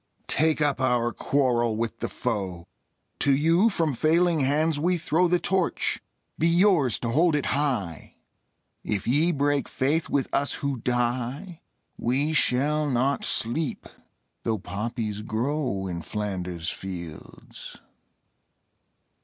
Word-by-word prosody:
Take 155 +1 +2
up 145 -2 +1
our 120 -2 +2
quarrel 120 -5 +1
with 115 0 -3
the - - -3
foe: 95 -8 -3 0.5
To 140 -1 +3
you 165 +9 +4
from 165 -8 0
failing 165 +5 +2
hands 145 +3 +1
we 175 +3 +1
throw 165 +2 +2
The 180 +1 +3
Torch: 185 0 0 0.4
be 165 - +3
yours 170 - +4
to 120 - -2
hold 160 +6 +3
it 145 - 0
high! 125 - -2 0.7
If 100 -3 -2
ye 150 +8 +3
break 145 -2 0
faith 150 +5 0
with 140 -2 +1
us 140 - +1
who 140 -2 -2
die 125 - -2 0.4
We 140 +6 0
shall 150 +2 +2
not 130 +2 +1
sleep, 130 +6 -1 0.6
though 110 -1 -1
poppies 105 +2 -4
grow 115 -1 -2
In 85 -2 -4
Flanders 90 -4 -4
fields. 85 -4 -9
135 Hz, 125 wpm, -26 LUFS, 115-155 Hz, 0.7 s, you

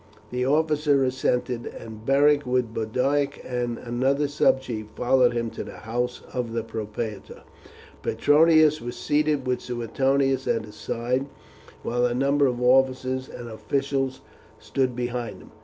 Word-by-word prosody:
The 125 +1 -1
officer 150 -1 +2
assented, 125 -2 -1
and 110 -1 -9
Beric 145 +3 +4
with 125 -3 0
Boduoc 135 +6 0
and 120 -2 -2
another 130 +4 0
subchief 130 -6 +1
followed 125 0 +3
him 115 -1 -2
to - - -5
the - - -10
house 120 +2 -2
of 120 -3 -3
the 115 -1 -1
propraetor. 110 -2 -6 0.6
Petronius 155 0 +4
was 120 +1 -5
seated 150 -2 +1
with 125 0 -1
Suetonius 130 +3 0
at 110 -1 0
his 105 - -12
side, 125 +4 -2 0.6
while 120 +1 +1
a 120 - -2
number 140 +2 +3
of 125 -1 -1
officers 130 0 +2
and 120 - -8
officials 135 +3 -2 0.4
stood 130 -2 -1
behind 120 -5 -3
him. - - -15
125 Hz, 140 wpm, -25 LUFS, 120-140 Hz, 0.6 s, Beric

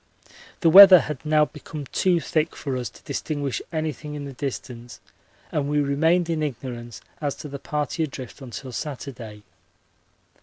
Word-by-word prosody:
The 165 - +5
weather 190 -1 +11
had 150 -4 -6
now 150 0 +3
become 150 0 -9
too 180 -2 +2
thick 155 0 -1
for 135 -3 -4
us 125 -4 -3
to - - -19
distinguish 145 -4 -3
anything 155 -2 -4
in 145 -1 -6
the 140 - -7
distance 125 -2 -6 0.5
and 145 -1 -1
we 150 0 +1
remained 160 +5 +2
in 165 -2 -1
ignorance 120 -5 -5 0.2
as 145 -2 -1
to - - -8
the 140 -1 -7
party 150 +3 -3
adrift 135 -1 -9
until 130 0 -8
Saturday. 120 -6 -7
145 Hz, 155 wpm, -24 LUFS, 130-155 Hz, 0.5 s, weather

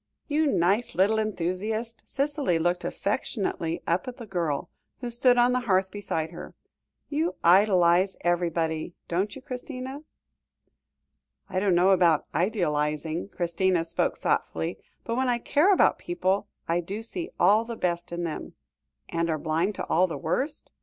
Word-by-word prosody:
"You 305 0 +2
nice 200 - +1
little 200 +5 +3
enthusiast!" 215 +3 -2
Cicely 280 - 0
looked 175 +2 0
affectionately 195 -6 -2
up 175 +9 0
at 250 - -6
the 235 - -8
girl, 170 -8 -2 0.3
who 245 -2 -4
stood 245 +1 +4
on 245 +1 +5
the 250 - +2
hearth 190 0 +3
beside 165 -6 -3
her; 175 - -9 0.5
"you 315 +4 -1
idealise 185 0 +5
everybody, 170 -2 0
don't 190 +5 -1
you, 270 - -10
Christina?" 260 +2 -6 1.5
"I 185 - 0
don't 190 -2 +2
know 180 +3 +5
about 170 -5 +4
idealising," 160 -2 0
Christina 175 -1 0
spoke 165 - -1
thoughtfully, 80 +4 -1 0.2
"but, 230 +1 -2
when 260 0 +1
I 240 - +2
care 295 +10 +3
about 380 - +4
people, 205 - -1 0.2
I 170 +1 +1
do 195 +6 -5
see 340 +9 -5
all 215 +2 +5
the 230 0 -6
best 175 -4 -2
in 170 0 -3
them 165 -2 -5 0.3
" 65 -1 -50
"And 170 0 -1
are 160 - +1
blind 165 +6 0
to - - -4
all 180 +3 +3
the 165 - -5
worst? 290 +3 -2
190 Hz, 155 wpm, -27 LUFS, 170-235 Hz, 1.5 s, on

